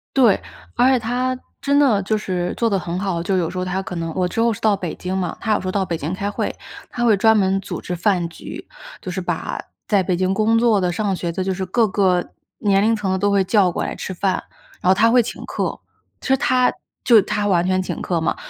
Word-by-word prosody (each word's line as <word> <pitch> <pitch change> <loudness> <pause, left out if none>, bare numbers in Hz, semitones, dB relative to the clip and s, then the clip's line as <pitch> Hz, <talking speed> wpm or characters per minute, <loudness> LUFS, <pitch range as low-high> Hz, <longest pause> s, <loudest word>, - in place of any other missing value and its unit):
对， 240 -7 +4 0.3
而 245 +2 +4
且 255 - +3
她 250 +3 -1 0.2
真 285 0 +2
的 245 -9 +4
就 215 +3 0
是 180 -4 -2
做 230 - +2
得 200 - +1
很 180 0 -4
好。 185 -4 -2
就 190 +2 0
有 170 -2 0
时 185 - -7
候 185 - -1
她 185 +1 -2
可 190 - -7
能 165 -1 -3
我 180 +1 0
之 225 - -2
后 235 0 +3
是 205 - -5
到 215 -2 +3
北 185 -4 -4
京 185 +1 -3
嘛， 180 -3 -3
她 220 -2 0
有 - - 0
时 185 - -5
候 - - 0
到 195 0 0
北 170 - -2
京 160 +3 -4
开 200 +2 -2
会， - - -2 0.4
她 240 - -2
会 225 -3 +5
专 220 +3 +4
门 195 -1 +2
组 - - -5
织 180 - -4
饭 180 -1 +1
局， 165 - -10 0.3
就 - - -6
是 185 +1 -3
把 175 - -3 0.3
在 200 -3 +3
北 180 0 0
京 185 +1 +1
工 220 +3 +2
作 225 -4 +3
的、 180 -1 +1
上 195 +1 -1
学 175 -1 -3
的， 185 +3 -2
就 190 0 -1
是 190 +1 -3
各 220 +4 +2
个 185 -3 +1 0.3
年 200 -1 +3
龄 225 +2 +3
层 210 -3 -3
的 190 - +1
都 205 +2 +1
会 200 -1 +3
叫 195 -1 +3
过 - - -3
来 - - -4
吃 190 - -5
饭， 190 +1 -1 0.4
然 180 - +1
后 - - +7
她 225 +4 +4
会 245 +1 +5
请 225 - -7
客， - - -3 0.4
其 - - -8
实 265 - +4
她 255 -1 +2 0.3
就 230 -4 +7
她 210 +1 -1
完 175 -3 +2
全 185 0 +1
请 185 - -5
客 175 -2 -1
嘛。 160 - 0
195 Hz, 280 characters per minute, -21 LUFS, 185-220 Hz, 0.4 s, 后